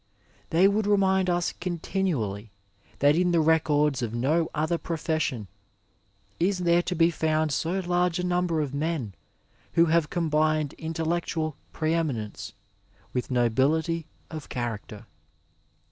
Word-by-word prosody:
They 175 +4 +5
would 205 +1 +1
remind 190 -2 +3
us 175 -1 +1
continually 165 - -2 0.5
that 145 +1 +4
in 180 +1 +2
the 170 -1 +3
records 150 -3 +2
of 115 -1 -3
no 155 +7 +1
other 160 +3 0
profession 155 - -2 0.9
is 185 +3 +2
there 175 -1 +3
to 180 +1 -3
be 165 +1 +4
found 155 -1 0
so 175 +7 -1
large 175 -1 +1
a 180 - -2
number 175 -3 +1
of 140 -3 -3
men 145 - -2 0.6
who 170 - +5
have 165 -1 +2
combined 155 -3 +1
intellectual 160 -1 -2 0.2
pre 160 0 -1
eminence 130 -11 -3 0.6
with 125 - -2
nobility 145 +7 +1 0.2
of 155 -3 -7
character. 115 -4 -5
160 Hz, 130 wpm, -26 LUFS, 145-175 Hz, 0.9 s, They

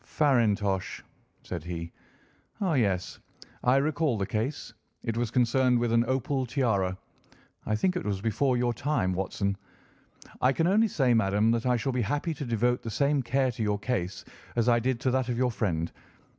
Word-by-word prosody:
"Farintosh," 105 - +1 0.4
said 85 -4 -5
he. 85 -1 -5 0.7
"Ah 190 -5 +1
yes, 100 -9 0 0.4
I 125 +1 +4
recall 145 -2 +1
the 100 - -1
case; 110 +9 -3 0.3
it 115 - -2
was 120 -1 -1
concerned 125 +1 +3
with 120 -1 0
an 115 0 +4
opal 130 0 -1
tiara. 110 -8 0 0.7
I 110 - +1
think 185 - +1
it 180 - -2
was 100 -2 -2
before 125 +5 +1
your 120 0 +1
time, 115 -8 0
Watson. 100 +1 -1 0.9
I 130 +2 +4
can 165 - +1
only 210 +5 +4
say, 135 - +2
madam, 105 0 +3
that 115 +1 0
I 125 -1 +3
shall 135 +3 -2
be 125 - 0
happy 145 +9 -1
to 145 -1 -6
devote 120 +1 +1
the 115 - -5
same 140 +4 +1
care 130 +1 +1
to 115 - -7
your 105 -1 +1
case 100 -4 -3 0.3
as 120 0 +1
I 120 0 +4
did 125 +1 -1
to 130 - +1
that 130 -1 0
of 120 - -1
your 125 0 +2
friend. 85 -7 -1
120 Hz, 185 wpm, -28 LUFS, 105-130 Hz, 0.9 s, I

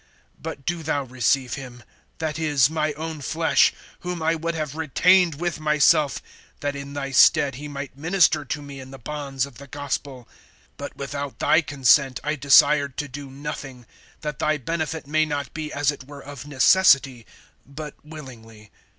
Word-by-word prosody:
But 155 -4 -7
do 175 -1 -2
thou 145 -2 -1
receive 130 0 0
him, 125 -3 -8 0.3
that 160 -1 -3
is, 145 -4 +3
my 155 -1 0
own 160 0 -6
flesh; 160 +3 +3 0.3
(13)whom 175 -2 -4
I 165 - +3
would 165 +1 -3
have 155 -3 -3
retained 170 +2 +3
with 175 +1 -3
myself, 150 -1 +3 0.4
that 145 0 -2
in 140 0 -7
thy 140 -1 -4
stead 140 +2 +5
he 145 +4 -7
might 140 -2 -7
minister 165 0 +2
to 145 +2 -4
me 140 -1 -9
in 130 0 -10
the 135 - -10
bonds 135 +1 -3
of 140 -3 -14
the 140 - -11
gospel. 140 -2 -5 0.5
(14)But 140 - -7
without 140 0 -5
thy 160 - +4
consent 135 -3 +3
I 150 - 0
desired 140 -1 +4
to 145 - -2
do 140 +1 -8
nothing; 135 -2 -7 0.4
that 150 -3 -5
thy 155 0 +1
benefit 160 +2 -3
may 155 +2 +2
not 145 -2 -4
be 155 -2 -5
as 145 0 +1
it 130 -3 -11
were 140 -1 -11
of 140 -1 -9
necessity, 135 - +4 0.4
but 150 +2 -8
willingly. 115 -8 -12
145 Hz, 170 wpm, -23 LUFS, 135-155 Hz, 0.5 s, stead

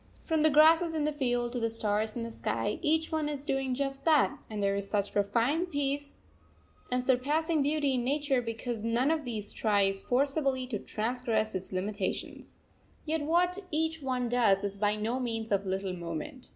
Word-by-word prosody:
From 320 -2 0
the 315 - +5
grasses 320 +3 +5
in 310 - 0
the 300 - +1
field 245 -4 -1
to 245 - -1
the 230 -1 0
stars 215 -1 -1
in 235 - -3
the 230 - -5
sky, 310 - -2
each 320 0 +1
one 310 -2 0
is 285 -2 -4
doing 270 -3 -1
just 275 0 -2
that; 305 -3 +4
and 210 -2 -3
there 200 0 +2
is 200 0 -3
such 205 -1 -1
profound 235 - +1
peace 285 -1 -2 0.8
and 250 0 +1
surpassing 295 +5 +1
beauty 290 -1 +1
in 250 -2 0
nature 280 0 +1
because 230 -1 -4
none 235 +5 +2
of 315 -3 -1
these 215 -4 -4
tries 200 -3 +1
forcibly 275 0 +1
to 235 -5 -4
transgress 225 -1 -1
its 190 0 -3
limitations. 195 +1 -4 0.5
Yet 315 0 -1
what 350 +5 +2
each 320 +1 -1
one 255 -2 -1
does 225 -5 +3
is 200 0 -3
by 210 0 +2
no 225 +4 -2
means 225 -3 -3
of 200 -1 +1
little 190 0 -2
moment. 175 - -6
250 Hz, 185 wpm, -30 LUFS, 215-295 Hz, 0.8 s, the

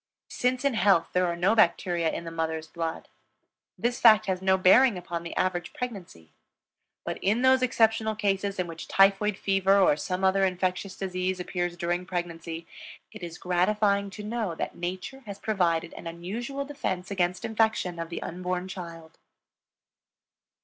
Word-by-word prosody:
Since 250 +2 0
in 280 - +3
health 200 -6 +3
there 180 0 +2
are 170 - -1
no 180 +5 +2
bacteria 175 -5 +2
in - - -5
the 165 - -7
mother's 160 -1 -2
blood, 165 -1 -5 0.7
this 240 +1 -1
fact 215 -2 +7
has 190 -2 -1
no 190 0 +3
bearing 205 +4 +5
upon 175 -1 -5
the 170 - -7
average 175 -1 -1
pregnancy; 185 - -7 0.7
but - - -4
in 215 +6 +1
those 260 0 +5
exceptional 225 -3 +2
cases 200 -1 -1
in 185 - 0
which 165 -1 -8
typhoid 195 +1 +3
fever 195 0 +3
or 190 -6 +5
some 180 +5 -3
other 190 +1 +3
infectious 185 +1 -1
disease 185 -1 -2
appears 175 -1 -3
during 175 +1 -2
pregnancy, 170 -2 -5 0.5
it 215 - -11
is 170 -1 -7
gratifying 200 +2 +1
to 210 +2 -9
know 215 -5 -3
that - - -4
Nature 185 +10 -5
has 200 -1 -6
provided 170 -6 0
an - - -9
unusual 230 +12 -5
defense 200 -11 -4
against 180 -2 -1
infection 220 -6 0
of 165 0 -4
the 170 - -5
unborn 180 +1 -3
child. 170 -4 -9
185 Hz, 160 wpm, -27 LUFS, 175-210 Hz, 0.7 s, fact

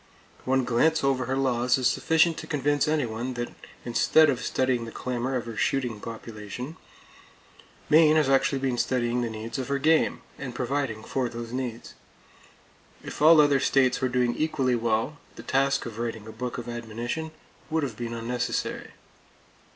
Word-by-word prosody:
One 130 0 +2
glance 155 +7 +2
over 135 -2 +1
her 130 +2 -1
laws 125 -2 +2
is 130 - -2
sufficient 160 +5 +3
to 160 - -8
convince 145 0 +1
anyone 125 -5 -1
that 120 0 -4 0.3
instead 145 +5 +4
of 125 - -4
studying 130 -3 0
the 115 - -8
clamor 125 +2 -3
of 120 -3 -2
her 115 -1 -7
shooting 120 -1 -1
population, 115 +5 -7 1.1
Maine 155 0 +6
has 155 -3 +3
actually 135 +1 +3
been 130 -2 -1
studying 125 -1 0
the 120 - -1
needs 110 +3 -5
of 130 - -3
her 140 - 0
game, 160 +3 +2 0.2
and 125 -3 -6
providing 125 -4 -2
for 130 0 -2
those 115 0 -7
needs. 125 -3 -5 1.1
If - - -8
all 160 +1 +8
other 145 -2 +5
states 130 -2 +2
were 130 - +1
doing 125 -1 +1
equally 140 -5 0
well, 115 +4 0 0.2
the - - -10
task 135 0 +1
of 115 -1 -7
writing 115 -2 -4
a 110 - -8
book 120 +2 -5
of 120 - -6
admonition 120 +6 -4 0.4
would 160 -1 0
have 125 -6 -3
been 115 +1 -5
unnecessary. 120 +1 -3
125 Hz, 165 wpm, -26 LUFS, 120-140 Hz, 1.1 s, all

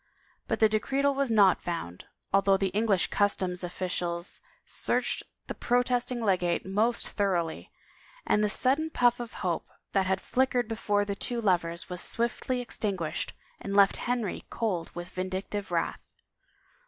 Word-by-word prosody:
But - - 0
the 220 - +7
decretal 270 +6 +1
was 275 -1 0
not 205 -5 +5
found, 130 - -5 0.3
although 195 0 +5
the 195 0 0
English 205 -3 +2
customs 190 -3 +1
officials 175 0 -3 0.2
searched - - -1 0.2
the - - -4
protesting 245 0 +1
legate 180 -4 +1
most 215 +5 +1
thor 200 -3 +1
oughly; 165 -2 -3 0.6
and 210 - +3
the 210 - +2
sudden 275 +8 +2
pufiF 245 -5 +3
of 240 -1 -6
hope 170 -3 -1 0.2
that 195 -2 +2
had 190 0 +1
flickered 250 -1 +1
before 205 -2 0
the 200 - -2
two 240 +4 -2
lovers 175 -5 +1
was 180 -1 -3
swiftly 240 +2 -1
extinguished 195 -9 -2 0.3
and 200 - -4
left 200 -1 +6
Henry 240 -5 -2
cold 195 -8 -2
with 175 +1 -6
vindictive 190 +2 -4
wrath. - - -1
200 Hz, 145 wpm, -29 LUFS, 185-235 Hz, 0.6 s, the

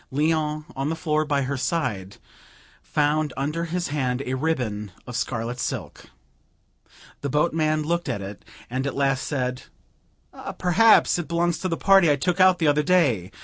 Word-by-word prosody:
Léon, 155 +1 0
on 135 +2 -2
the 165 - -1
floor 155 -2 0
by 145 -2 0
her 135 +1 -2
side, 115 - -2 0.6
found 150 -1 0
under 150 +5 -2
his 175 0 -3
hand 130 -3 -1
a 130 - -3
ribbon 125 -8 -2
of 125 - -7
scarlet 120 0 -3
silk. - - -5 1.2
The 140 - -2
boatman 155 +1 +1
looked 170 +3 -1
at - - -2
it, 100 -1 -8 0.2
and 130 +3 -2
at 140 - -4
last 135 -1 0
said 125 -3 -2 1.0
"Perhaps 200 +1 +4
it 170 - -4
belongs 170 +1 0
to 185 - -2
the 165 -2 -2
party 195 -4 +5
I 145 - +4
took 180 +6 -1
out 185 -1 +6
the 165 - 0
other 145 +1 +3
day. 140 - +2
150 Hz, 165 wpm, -24 LUFS, 130-165 Hz, 1.2 s, out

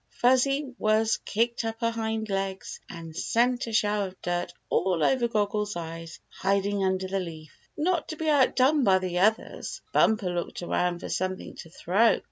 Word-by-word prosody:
Fuzzy 260 +2 +2
Wuzz 220 +1 +2
kicked 235 +2 0
up 225 0 -4
her 230 0 +2
hind 220 -1 -2
legs 195 -1 -3
and 165 -2 -9
sent 245 +6 +1
a - - -4
shower 210 -2 +1
of 185 0 -14
dirt 175 0 -1 0.2
all 180 -4 +1
over 245 - +3
Goggle 210 -2 0
Eyes 165 0 -7
hiding 200 +1 0
under 190 0 0
the 195 +1 -1
leaf. 160 -4 -8 0.2
Not 340 +2 0
to 315 - -5
be 315 0 -4
outdone 280 0 +4
by 190 -4 +5
the 180 -1 -2
others, 215 +4 0
Bumper 210 -5 +3
looked 175 0 -4
around 175 0 0
for - - -6
something 185 0 -3
to 165 - -10
throw. 200 +7 +3
205 Hz, 170 wpm, -27 LUFS, 185-235 Hz, 0.2 s, by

